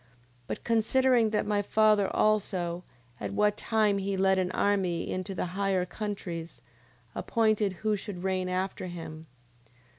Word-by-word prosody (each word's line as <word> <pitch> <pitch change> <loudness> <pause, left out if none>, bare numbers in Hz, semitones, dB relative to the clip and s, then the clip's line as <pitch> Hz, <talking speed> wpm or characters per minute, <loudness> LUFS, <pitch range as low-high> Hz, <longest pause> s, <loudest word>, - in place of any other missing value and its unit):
9:23. 125 - -31 0.4
But - - -5
considering 235 +1 +3
that 210 -1 0
my 205 -1 +1
father 210 -1 +3
also, 185 -5 0 0.4
at 100 -1 -4
what 210 - +3
time 215 -3 +1
he 195 0 -2
led 190 0 +3
an 185 0 0
army 185 -4 0
into 185 +1 -4
the - - -1
higher 195 -2 +1
countries, 180 -5 -5 0.5
appointed 215 -3 +1
who 215 -1 +2
should 195 -3 -7
reign 185 -1 0
after 185 0 -2
him: 160 -2 -8 0.4
9:24. - - -32
195 Hz, 150 wpm, -29 LUFS, 180-215 Hz, 0.5 s, considering